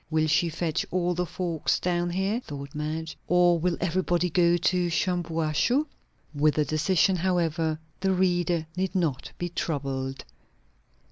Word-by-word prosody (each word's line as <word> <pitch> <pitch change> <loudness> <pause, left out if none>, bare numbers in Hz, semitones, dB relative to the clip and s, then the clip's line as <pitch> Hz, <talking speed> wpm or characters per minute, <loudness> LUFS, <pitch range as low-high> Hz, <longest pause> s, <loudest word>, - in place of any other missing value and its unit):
Will 155 -1 +2
she 155 +3 +2
fetch 160 -1 -1
all 180 0 0
the 175 0 -2
folks 170 -4 -1
down 175 -1 0
here? 195 +5 0
thought 140 - -8
Madge. 155 +2 -4
Or 175 -1 +4
will 175 +1 0
everybody 180 -1 0
go 175 0 +4
to 175 0 +1
Shampuashuh? 170 - +1 0.5
With 150 +1 +2
the 150 - +2
decision, 180 +4 +2
however, 165 -3 0 0.2
the 190 0 +1
reader 175 -3 +1
need 190 +1 -2
not 165 -8 -1
be 175 - -3
troubled. 135 -5 -3
175 Hz, 140 wpm, -27 LUFS, 155-180 Hz, 0.5 s, Or